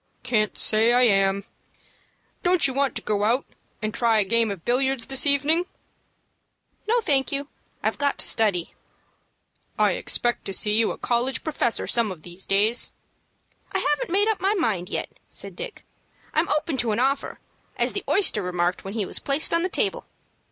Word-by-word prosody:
"Can't 215 Hz, -4 st, 0 dB
say 225 Hz, +2 st, +2 dB
I 250 Hz, +1 st, +5 dB
am. 195 Hz, -3 st, +3 dB, 1.0 s
Don't 355 Hz, -3 st, +3 dB
you 265 Hz, -, +3 dB
want 275 Hz, 0 st, 0 dB
to -, -, -2 dB
go 205 Hz, -1 st, 0 dB
out 240 Hz, +5 st, +1 dB, 0.4 s
and 215 Hz, 0 st, -2 dB
try 230 Hz, -2 st, +3 dB
a 210 Hz, -, +4 dB
game 230 Hz, +3 st, +2 dB
of 195 Hz, -5 st, -6 dB
billiards 260 Hz, 0 st, +1 dB
this 270 Hz, +1 st, +2 dB
evening?" 295 Hz, +5 st, +3 dB, 1.2 s
"No, 470 Hz, +2 st, +2 dB
thank 275 Hz, -9 st, +2 dB
you. 280 Hz, 0 st, -3 dB, 0.3 s
I've -, -, -1 dB
got 285 Hz, -1 st, +1 dB
to -, -, -1 dB
study." 200 Hz, -7 st, +1 dB, 1.0 s
"I -, -, +4 dB
expect 240 Hz, 0 st, 0 dB
to 195 Hz, -, -4 dB
see 210 Hz, +2 st, +3 dB
you 225 Hz, 0 st, +3 dB
a -, -, -6 dB
college 245 Hz, +2 st, -1 dB
professor 290 Hz, -7 st, -1 dB
some 230 Hz, -4 st, +1 dB
of 165 Hz, -4 st, -10 dB
these 175 Hz, +2 st, -9 dB
days." 210 Hz, +4 st, +1 dB, 0.8 s
"I -, -, +2 dB
haven't 295 Hz, -6 st, 0 dB
made 405 Hz, +3 st, +3 dB
up 440 Hz, -4 st, 0 dB
my 395 Hz, +3 st, +2 dB
mind 210 Hz, -, -1 dB
yet," -, -, -3 dB, 0.2 s
said -, -, -5 dB
Dick. -, -, -8 dB, 0.5 s
"I'm 315 Hz, +3 st, +1 dB
open 300 Hz, -1 st, 0 dB
to 235 Hz, -3 st, 0 dB
an 210 Hz, -, -1 dB
offer, 270 Hz, +2 st, 0 dB, 0.4 s
as -, -, +1 dB
the -, -, -3 dB
oyster 380 Hz, -, +3 dB
remarked 180 Hz, -1 st, -1 dB
when 195 Hz, +2 st, -7 dB
he 215 Hz, -3 st, -1 dB
was -, -, -2 dB
placed 280 Hz, +4 st, +1 dB
on 335 Hz, -, +3 dB
the 365 Hz, -, -1 dB
table. -, -, -1 dB
240 Hz, 180 wpm, -24 LUFS, 210-285 Hz, 1.2 s, I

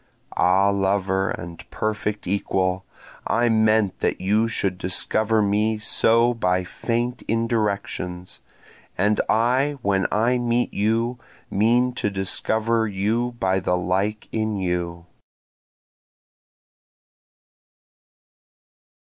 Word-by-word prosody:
Ah 95 Hz, +3 st, +3 dB
lover 95 Hz, -1 st, 0 dB
and 85 Hz, 0 st, -7 dB
perfect 105 Hz, -1 st, -3 dB
equal, 95 Hz, -1 st, -1 dB, 0.4 s
I 120 Hz, +1 st, +2 dB
meant 110 Hz, -3 st, +2 dB
that -, -, -1 dB
you 105 Hz, +4 st, +2 dB
should 95 Hz, -5 st, -2 dB
discover 110 Hz, +4 st, +1 dB
me 105 Hz, +2 st, +1 dB
so 115 Hz, +2 st, +3 dB
by 90 Hz, -5 st, 0 dB
faint 120 Hz, +6 st, -3 dB
indirections, 105 Hz, -5 st, -2 dB, 0.6 s
And 105 Hz, +3 st, +2 dB
I 130 Hz, +6 st, +2 dB
when 95 Hz, -1 st, +1 dB
I 120 Hz, +4 st, +2 dB
meet 120 Hz, 0 st, 0 dB
you 115 Hz, +4 st, 0 dB, 0.3 s
mean 120 Hz, +5 st, +2 dB
to 105 Hz, -, +1 dB
discover 110 Hz, +4 st, 0 dB
you 110 Hz, +5 st, -1 dB
by 95 Hz, 0 st, +1 dB
the 90 Hz, -1 st, 0 dB
like 95 Hz, +4 st, -1 dB
in 110 Hz, -1 st, -1 dB
you. 85 Hz, -2 st, -3 dB
105 Hz, 95 wpm, -23 LUFS, 95-115 Hz, 0.6 s, Ah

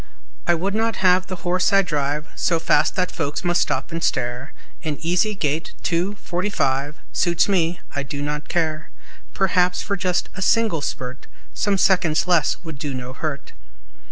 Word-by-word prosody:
I 175 Hz, -, +5 dB
would 190 Hz, +4 st, -1 dB
not 225 Hz, +1 st, +1 dB
have 185 Hz, 0 st, +5 dB
the 185 Hz, -2 st, -7 dB
horse 180 Hz, +3 st, +2 dB
I 195 Hz, 0 st, +5 dB
drive 150 Hz, -3 st, -1 dB
So 170 Hz, -, +1 dB
fast 165 Hz, -, +2 dB
that 180 Hz, -1 st, 0 dB
folks 150 Hz, 0 st, -3 dB
must 175 Hz, 0 st, +2 dB
stop -, -, -1 dB
and 165 Hz, 0 st, -3 dB
stare; 120 Hz, +3 st, -1 dB, 0.3 s
An 150 Hz, -2 st, -2 dB
easy 180 Hz, +6 st, +1 dB
gait 155 Hz, -2 st, -1 dB
two, 180 Hz, +4 st, 0 dB
forty 185 Hz, 0 st, -2 dB
five 140 Hz, -4 st, 0 dB, 0.2 s
Suits 170 Hz, -2 st, +2 dB
me; 175 Hz, -3 st, +1 dB, 0.2 s
I 140 Hz, -, 0 dB
do 140 Hz, +1 st, -5 dB
not 150 Hz, +1 st, -3 dB
care; 155 Hz, -2 st, -1 dB, 0.5 s
Perhaps, 180 Hz, -1 st, +2 dB
for 200 Hz, -, -1 dB
just 180 Hz, -2 st, 0 dB
a 190 Hz, -, -7 dB
single 215 Hz, -5 st, +2 dB
spurt, 130 Hz, -2 st, -5 dB, 0.3 s
Some 205 Hz, -2 st, +1 dB
seconds 175 Hz, -4 st, +3 dB
less 175 Hz, -4 st, +3 dB
would 160 Hz, -5 st, -8 dB
do 140 Hz, -2 st, -3 dB
no 125 Hz, 0 st, -6 dB
hurt. 145 Hz, 0 st, -4 dB
170 Hz, 175 wpm, -22 LUFS, 150-185 Hz, 0.5 s, I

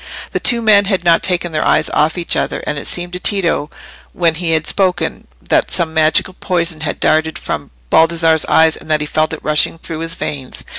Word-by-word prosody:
The -, -, -2 dB
two 235 Hz, -1 st, +3 dB
men 205 Hz, -2 st, +5 dB
had 195 Hz, -3 st, -1 dB
not 170 Hz, -1 st, +3 dB
taken 175 Hz, -2 st, -1 dB
their 155 Hz, -1 st, -1 dB
eyes 155 Hz, -, +2 dB
off 155 Hz, +4 st, +1 dB
each 175 Hz, -, -1 dB
other, -, -, -2 dB
and 150 Hz, -, -3 dB
it -, -, -7 dB
seemed 175 Hz, 0 st, -3 dB
to 180 Hz, -, -4 dB
Tito, 175 Hz, -7 st, 0 dB, 0.4 s
when 170 Hz, -2 st, +1 dB
he 165 Hz, 0 st, -2 dB
had 160 Hz, 0 st, 0 dB
spoken, 185 Hz, -2 st, -1 dB, 0.2 s
that -, -, +1 dB
some 165 Hz, -3 st, -1 dB
magical 160 Hz, +3 st, +2 dB
poison 170 Hz, -4 st, -1 dB
had 155 Hz, -1 st, -4 dB
darted 160 Hz, 0 st, +1 dB
from -, -, -5 dB, 0.2 s
Baldassarre's 165 Hz, -1 st, +3 dB
eyes, 160 Hz, 0 st, +3 dB
and -, -, -14 dB
that 155 Hz, -1 st, +1 dB
he -, -, -2 dB
felt 155 Hz, +1 st, -1 dB
it -, -, -6 dB
rushing 150 Hz, +2 st, +1 dB
through 165 Hz, -1 st, -7 dB
his 165 Hz, 0 st, -4 dB
veins. 140 Hz, -7 st, -6 dB
165 Hz, 210 wpm, -15 LUFS, 155-180 Hz, 0.4 s, men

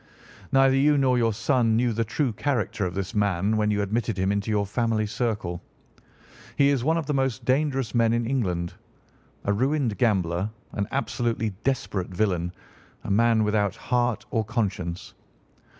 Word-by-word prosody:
Neither 135 Hz, 0 st, +5 dB
you 145 Hz, +2 st, +4 dB
nor 130 Hz, -2 st, +3 dB
your 115 Hz, -1 st, +2 dB
son 115 Hz, +1 st, +1 dB
knew 120 Hz, 0 st, +2 dB
the 115 Hz, +1 st, 0 dB
true 120 Hz, +3 st, -1 dB
character 110 Hz, -5 st, -1 dB
of 90 Hz, -, -6 dB
this 95 Hz, +2 st, -3 dB
man 100 Hz, -1 st, +1 dB
when 105 Hz, -1 st, +1 dB
you 105 Hz, -1 st, +1 dB
admitted 110 Hz, +1 st, -1 dB
him 95 Hz, +1 st, +1 dB
into 100 Hz, +1 st, -1 dB
your 105 Hz, -1 st, +1 dB
family 110 Hz, +1 st, 0 dB
circle. 105 Hz, -6 st, -2 dB, 0.9 s
He 140 Hz, 0 st, +4 dB
is 135 Hz, -4 st, +1 dB
one 160 Hz, +4 st, +2 dB
of 165 Hz, -, -2 dB
the 150 Hz, -, -1 dB
most 135 Hz, -4 st, -1 dB
dangerous 135 Hz, -2 st, +1 dB
men 115 Hz, -2 st, +3 dB
in 120 Hz, 0 st, +1 dB
England—a 100 Hz, -3 st, -4 dB
ruined 130 Hz, 0 st, 0 dB
gambler, 95 Hz, -5 st, +1 dB, 0.2 s
an 100 Hz, -1 st, -2 dB
absolutely 120 Hz, -5 st, -1 dB
desperate 110 Hz, -8 st, -1 dB
villain, 90 Hz, -2 st, 0 dB, 0.5 s
a -, -, -4 dB
man 115 Hz, +1 st, +4 dB
without 105 Hz, -1 st, +1 dB
heart 120 Hz, -1 st, -1 dB
or 115 Hz, -, +1 dB
conscience. 100 Hz, -6 st, -3 dB
115 Hz, 160 wpm, -25 LUFS, 100-125 Hz, 0.9 s, Neither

